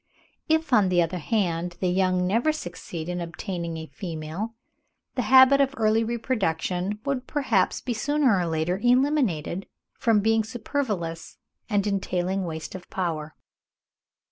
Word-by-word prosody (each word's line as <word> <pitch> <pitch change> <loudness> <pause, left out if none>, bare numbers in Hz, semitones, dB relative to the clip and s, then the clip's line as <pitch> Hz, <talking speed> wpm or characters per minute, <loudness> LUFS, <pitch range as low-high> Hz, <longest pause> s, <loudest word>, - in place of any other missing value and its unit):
If, 320 -3 +1
on 205 -5 +5
the 180 -1 +3
other 175 +2 -3
hand, 175 -2 -1
the 185 - 0
young 185 0 +2
never 230 +11 +2
succeeded 175 - -6
in 175 0 -3
obtaining 170 0 -4
a 160 - -6
female, 170 +6 -5 0.6
the 255 - -1
habit 260 +4 +7
of 275 0 +1
early 220 0 +3
reproduction 205 -5 -1
would 270 -2 -2
perhaps 250 -10 +1
be 250 - -2
sooner 275 0 +2
or 175 - 0
later 165 +3 -1
eliminated, 245 - +1 0.3
from 225 -3 +3
being 220 +1 +2
superfluous 210 - -3 0.3
and 205 -2 +1
entailing 190 -1 -1
waste 160 -2 -5
of 185 -2 -9
power. 160 -4 -3
195 Hz, 140 wpm, -25 LUFS, 175-240 Hz, 0.6 s, habit